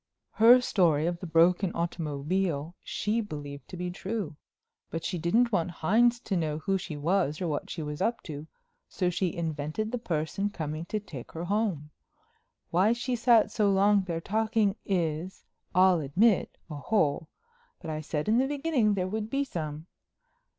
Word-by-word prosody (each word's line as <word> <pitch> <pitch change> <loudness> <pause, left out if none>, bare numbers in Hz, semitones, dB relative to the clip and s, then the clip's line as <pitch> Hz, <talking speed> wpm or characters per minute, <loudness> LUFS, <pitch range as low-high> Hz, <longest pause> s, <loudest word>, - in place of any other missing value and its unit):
"Her 235 +3 +7
story 165 -10 +2
of 170 0 -1
the 180 - -6
broken 170 +3 +3
automobile 165 0 -2
she 215 +3 -1
believed 145 -8 -7
to 180 - -8
be 180 0 -3
true. 195 -3 -4 0.5
But 165 0 -4
she 180 - -2
didn't 230 +9 +2
want 180 -4 +1
Hines 230 +9 +2
to 195 - -2
know 155 -3 -1
who 195 +4 -1
she 165 -4 -6
was 155 -1 +1
or 180 - -2
what 150 -2 -3
she 165 - -4
was 150 +2 -5
up 230 +4 0
to, 150 0 -7 0.4
so 180 -2 0
she 180 0 0
invented 160 +6 -3
the 245 - -2
person 170 +1 -2
coming 155 -3 -5
to 215 +4 -2
take 150 - -10
her 165 - -5
home. 190 -7 -1 0.8
Why 190 +6 +4
she 245 +1 -2
sat 235 -2 +4
so 210 -2 +2
long 200 +1 +4
there 170 -3 -2
talking 215 +1 +1
is—I'll 180 +1 0
admit—a 170 +3 +1
hole, 155 -2 0 0.5
but 165 - -6
I 155 0 -3
said 150 +1 -3
in 225 +3 +4
the 265 - +2
beginning 275 -7 +1
there 185 -1 -1
would 215 +2 -3
be 275 +3 0
some. 155 - -5
180 Hz, 165 wpm, -28 LUFS, 155-215 Hz, 0.8 s, Her